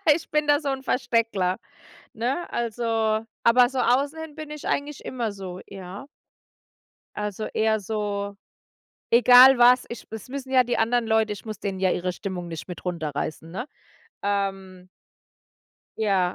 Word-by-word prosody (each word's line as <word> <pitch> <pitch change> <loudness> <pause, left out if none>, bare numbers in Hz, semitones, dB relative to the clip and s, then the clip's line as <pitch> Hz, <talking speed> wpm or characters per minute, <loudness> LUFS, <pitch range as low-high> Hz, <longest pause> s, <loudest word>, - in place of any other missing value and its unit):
Ich 320 - -7
bin 300 0 +1
da 290 +1 +4
so 290 - -2
‘n 270 -1 -2
"Versteckler", 230 -7 0 0.5
ne, 255 +9 -2
also 225 -1 0 0.2
aber 245 +1 +6
so 265 0 -3
außen 275 +6 +2
hin 320 -1 -7
bin 310 -1 -8
ich 300 -1 -8
eigentlich 290 0 -2
immer 235 -5 -3
so, 185 -2 -7
ja. 190 +2 -9 1.1
Also, 210 0 -3
eher 220 0 +2
so 205 -1 -3 0.7
egal 250 +2 +8
was, 245 +1 +6
ich 235 - -8
das 220 +2 -8
müssen 270 -1 -6
ja 255 -1 +5
die 245 - -1
anderen 230 +1 +2
Leute 220 -1 +2
ich 200 - -12
muss 215 -3 -7
denen 195 -2 -3
ja 190 -1 +3
ihre 180 +1 -1
Stimmung 180 -2 -5
nicht 165 -2 -7
mit 180 -2 -8
runterreißen, 160 -2 -4
ne? 225 +9 -5 0.6
Ähm 195 -2 -3 1.1
Ja. 195 -4 +1
220 Hz, 155 wpm, -25 LUFS, 195-250 Hz, 1.1 s, egal